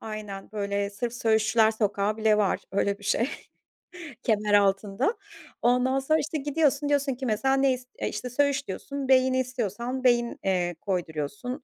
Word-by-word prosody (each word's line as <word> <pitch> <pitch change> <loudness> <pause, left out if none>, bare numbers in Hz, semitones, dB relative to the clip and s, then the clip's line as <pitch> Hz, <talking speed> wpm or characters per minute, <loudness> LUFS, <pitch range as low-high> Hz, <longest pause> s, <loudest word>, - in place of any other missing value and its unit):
Aynen, 215 -2 -7
böyle 200 -1 -2
sırf 230 +4 -4
söğüşçüler 220 -1 +3
sokağı 210 -1 0
bile 220 -1 +3
var; 200 -2 +1
öyle 200 +1 0
bir 205 - -14
şey 235 +5 +1 1.0
Kemeraltı'nda. 205 - +2 0.4
Ondan 250 +2 +2
sonra 310 +4 +2
işte 310 +1 -2
gidiyorsun, 290 0 +1
diyorsun 285 -2 +1
ki 260 +2 -6
mesela, 240 +4 +1
ne 270 -1 +3
is 250 0 -7 0.2
İşte 250 - -3
söğüş 275 +1 +1
diyorsun. 275 +8 -5
Beyni 260 0 +4
istiyorsan, 250 0 -3
beyin, 240 -1 +2
eee, 180 -2 0
koyduruyorsun. 185 - -3
235 Hz, 145 wpm, -26 LUFS, 205-265 Hz, 1.0 s, Beyni